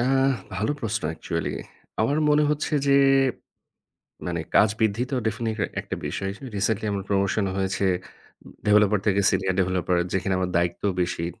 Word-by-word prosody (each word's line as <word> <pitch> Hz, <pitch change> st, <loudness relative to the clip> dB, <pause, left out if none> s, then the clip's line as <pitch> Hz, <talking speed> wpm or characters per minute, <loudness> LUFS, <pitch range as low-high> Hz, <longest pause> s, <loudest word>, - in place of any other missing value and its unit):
আহ 135 Hz, +1 st, +3 dB, 0.2 s
ভালো 110 Hz, +7 st, 0 dB
প্রশ্ন 110 Hz, -1 st, -2 dB
actually 80 Hz, +1 st, -3 dB, 0.5 s
আমার 140 Hz, +7 st, +2 dB
মনে 150 Hz, 0 st, +4 dB
হচ্ছে 150 Hz, +1 st, -2 dB
যে, 140 Hz, -, +5 dB, 1.3 s
মানে 85 Hz, -1 st, -2 dB, 0.2 s
কাজ 105 Hz, -, +6 dB
বৃদ্ধি 110 Hz, +2 st, +1 dB
তো -, -, 0 dB
definitely 110 Hz, +1 st, -2 dB, 0.3 s
একটা -, -, -5 dB
বিষয় 95 Hz, -, -3 dB
হিসেবে 125 Hz, +6 st, -9 dB
রিসেন্টলি 105 Hz, +1 st, 0 dB
আমার 100 Hz, -1 st, -2 dB
প্রমোশন 100 Hz, +1 st, +1 dB
হয়েছে 95 Hz, 0 st, 0 dB, 0.8 s
ডেভেলপার 105 Hz, 0 st, +4 dB
থেকে 100 Hz, -1 st, +3 dB
সিনিয়র 95 Hz, -1 st, 0 dB
ডেভেলপারে। 90 Hz, -1 st, +1 dB
যেখানে 95 Hz, 0 st, 0 dB
আমার 90 Hz, -1 st, -1 dB
দায়িত্বও 85 Hz, +3 st, 0 dB
বেশি। 85 Hz, -1 st, -1 dB
100 Hz, 145 wpm, -25 LUFS, 95-110 Hz, 1.3 s, কাজ